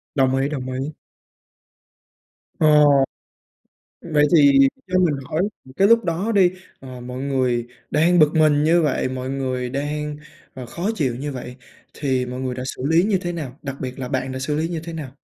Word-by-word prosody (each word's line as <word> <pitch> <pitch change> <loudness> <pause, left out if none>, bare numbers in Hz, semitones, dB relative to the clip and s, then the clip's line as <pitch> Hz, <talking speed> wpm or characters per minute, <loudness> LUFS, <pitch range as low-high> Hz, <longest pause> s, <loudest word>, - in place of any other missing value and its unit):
Đồng 130 -1 +2
ý, 135 +2 0
đồng 130 -3 -4
ý. 135 +4 -4 1.6
Ờ, 155 - +4 1.5
vậy 150 0 +4
thì 140 -3 +6 0.3
cho 185 0 +1
mình 175 -5 +3
hỏi, 160 +3 -1 0.3
cái 195 - +4
lúc 230 0 +5
đó 180 +7 -1
đi, 185 -4 +4 0.3
ờ, 130 -2 -9
mọi 125 +1 -7
người 130 -4 0 0.2
đang 170 +4 +3
bực 155 0 +5
mình 150 -2 +4
như 170 +2 +4
vậy, 145 -4 0
mọi 130 0 -4
người 130 -2 -2
đang, 150 +2 -3 0.4
ờ, 130 -2 -8
khó 170 - -3
chịu 135 - -1
như 145 +3 -4
vậy 125 -1 -8 0.4
thì 130 -3 -1
mọi 125 +1 -6
người 130 -1 -3
đã 125 - -5
xử 125 - -6
lý 165 +3 +4
như 200 -2 +1
thế 175 - -3
nào? 145 -6 -6
Đặc 140 -1 -5
biệt 130 0 -5
là 130 -2 -4
bạn 130 -1 -2
đã 130 - -4
xử 135 +3 -2
lý 160 +2 -1
như 165 -2 -4
thế 170 - -7
nào? 155 -5 -6
140 Hz, 195 wpm, -21 LUFS, 130-160 Hz, 1.6 s, thì